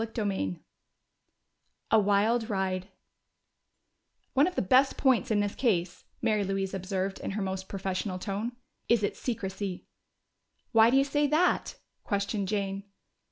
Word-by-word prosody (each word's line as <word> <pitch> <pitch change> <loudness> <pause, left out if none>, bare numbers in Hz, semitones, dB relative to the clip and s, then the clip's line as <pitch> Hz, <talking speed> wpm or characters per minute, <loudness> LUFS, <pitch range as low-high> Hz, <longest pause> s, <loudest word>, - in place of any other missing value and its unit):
CHAPTER 225 -1 -3
VI 95 - -1 1.4
A 220 - +6
Wild 215 +3 +2
Ride 190 -2 -1 1.5
"One 275 +4 +4
of 365 - -4
the - - +1
best 260 +8 +4
points 260 -1 +3
in 210 -2 +2
this 205 0 -1
case," 180 -8 0 0.2
Mary 215 -3 +2
Louise 195 0 -2
observed, 190 0 -2
in - - -4
her 205 +1 -3
most 190 0 -4
professional 190 -1 -3
tone, 205 +5 -3 0.4
"is 235 -3 +4
its 200 - -1
secrecy." 195 -5 -4 0.9
"Why 225 -1 +6
do 260 - +4
you 275 - +5
say 290 +1 +1
that?" 315 +5 +2 0.3
questioned 200 0 -1
Jane. 200 -1 -2
205 Hz, 140 wpm, -29 LUFS, 195-235 Hz, 1.5 s, A